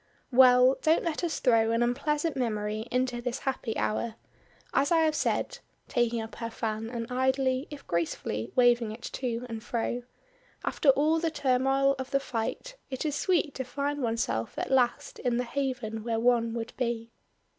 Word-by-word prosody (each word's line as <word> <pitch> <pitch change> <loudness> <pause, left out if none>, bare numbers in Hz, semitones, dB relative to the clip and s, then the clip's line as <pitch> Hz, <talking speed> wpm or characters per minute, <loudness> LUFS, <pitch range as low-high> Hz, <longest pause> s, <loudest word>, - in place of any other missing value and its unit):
"Well, 255 +1 +6
don't 315 +1 +3
let 335 0 -2
us 335 -2 -1
throw 230 -3 +4
an 230 +1 +2
unpleasant 295 +5 0
memory 215 -3 -2
into 250 -1 0
this 245 +1 -2
happy 255 -4 -2
hour. 225 +1 -1 0.6
As 285 - +2
I 330 -1 +5
have 315 -1 +3
said," - - -1 0.3
taking 240 -2 +1
up 220 - -9
her 230 - -4
fan 225 -1 -3
and 235 -1 -4
idly, 260 +1 +1
if 290 -2 -9
gracefully, 140 -9 -2
waving 240 -3 +4
it 225 +2 -9
to 245 -2 -3
and 225 -2 -6
fro, 240 +1 -2 0.6
"after 290 - +2
all 305 +4 +4
the 330 0 0
turmoil 270 -1 +2
of 260 - -4
the 275 - +2
fight 275 - -4
it 260 +2 -4
is 295 -2 0
sweet 320 -3 +1
to 260 - -3
find 285 +3 -3
oneself 225 - -1
at - - -3
last 250 -2 +1
in 245 -2 0
the 250 - +1
haven 245 -4 -3
where 225 -1 -1
one 230 -1 +2
would 230 0 -4
be." 235 -2 -2
250 Hz, 175 wpm, -28 LUFS, 230-275 Hz, 0.6 s, Well